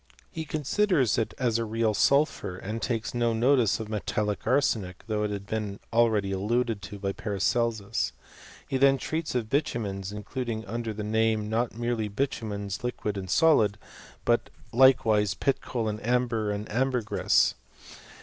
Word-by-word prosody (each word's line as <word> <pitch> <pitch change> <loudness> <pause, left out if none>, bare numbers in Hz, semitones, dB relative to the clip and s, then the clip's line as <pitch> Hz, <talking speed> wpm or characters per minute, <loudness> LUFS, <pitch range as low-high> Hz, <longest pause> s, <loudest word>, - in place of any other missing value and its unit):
He 160 -1 -5
considers 155 - +1
it 115 - -2
as 120 -3 +1
a - - 0
real 110 0 0
sulphur, 105 - +2
and 110 +4 -5
takes 115 -3 -2
no 120 -1 +1
notice 120 -1 +3
of 110 - -5
metallic 105 -1 -2
arsenic, 110 -9 +1
though 105 -1 -1
it 105 - 0
had 100 -1 -5
been 105 -1 -3
already 110 -4 +3
alluded 110 +3 0
to 100 +2 -8
by 100 0 -2
Paracelsus. 105 +1 -1 0.6
He 135 - 0
then 135 0 +5
treats 155 +1 -3
of 120 -3 0
bitumens, 105 -8 -2
including 110 +1 -4
under 115 +2 -3
the 105 0 -5
name 110 0 +1
not 115 +1 0
merely 120 -2 -1
bitu 115 +1 -2
mens 100 +3 -4
liquid 115 -4 -2
and 95 -2 -5
solid, 110 - +4 0.5
but - - +2 0.2
likewise 110 -6 +4
pit 135 +5 0
coal, 115 -3 -3
amber, 120 -2 0
and 105 +1 -3
ambergris. 125 -1 +2
110 Hz, 150 wpm, -27 LUFS, 105-125 Hz, 0.6 s, then